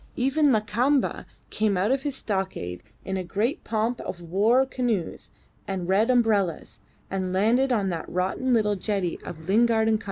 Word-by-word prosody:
Even 275 +3 +2
Lakamba 240 +5 +1 0.2
came 210 -3 +1
out 200 +6 +1
of 270 0 +1
his 285 -1 -3
stockade 190 - -3 0.2
in 190 0 -2
a 185 - -2
great 215 - -2
pomp 225 +2 -1
of 175 - -6
war 205 +10 +2
canoes 245 -9 -2 0.4
and 185 -3 -3
red 205 +5 +3
umbrellas, 215 -9 +1 0.3
and 190 -1 -2
landed 230 +8 +2
on 205 -5 +1
the 170 -3 -3
rotten 190 +8 -1
little 210 -3 +2
jetty 195 -3 -2
of 160 -1 -9
Lingard 220 +2 +3
and 220 -1 +3
Co. - - -15
215 Hz, 165 wpm, -25 LUFS, 190-245 Hz, 0.4 s, red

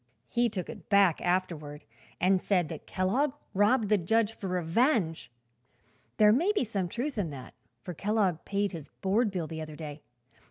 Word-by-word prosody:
"He 240 0 +2
took 190 -4 -4
it - - -10
back, 200 -5 +4
afterward, 170 -5 -2 0.4
and 185 +1 +3
said 180 -6 +1
that 160 - -8
Kellogg 250 +10 +1 0.2
robbed 210 +3 +3
the 210 -2 +4
judge 225 +5 +1
for 200 - -6
revenge. 180 - +1 0.9
There 210 -1 +7
may 340 - +3
be 410 - +1
some 200 -6 -2
truth 245 - -3
in 180 -5 -1
that, 135 -3 -9 0.3
for 180 - -5
Kellogg 195 -2 0
paid 200 0 -1
his 160 -5 -8
board 210 +4 +2
bill 180 -4 -3
the 160 0 -6
other 155 -1 -7
day. 150 -1 -8
190 Hz, 170 wpm, -29 LUFS, 165-220 Hz, 0.9 s, There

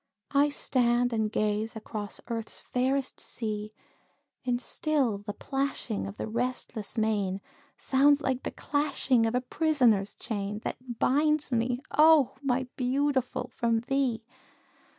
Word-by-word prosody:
I 285 +1 +4
stand 245 -3 +2
and 220 -1 0
gaze 215 +1 0
across 215 -2 -6
Earth's 230 -2 -4
fairest 260 +2 -1
sea, 215 -2 -3 0.7
And 245 -1 0
still 265 -7 0
the 205 0 -6
plashing 270 -5 -2
of 200 - -8
the - - -3
restless 235 -1 -3
main, 205 -3 +1 0.4
Sounds 280 +2 +4
like 265 -3 -1
the - - -3
clashing 275 -5 +1
of 225 - -1
a 250 - +2
prisoner's 250 -9 +2
chain, 205 -2 -3
That 250 -2 -5
binds 300 +3 +2
me, 245 +1 0
oh! 310 -3 +6
my 260 -2 0
Beautiful, 260 0 0
from 230 -1 +1
thee. 250 -3 0
245 Hz, 130 wpm, -29 LUFS, 220-275 Hz, 0.7 s, oh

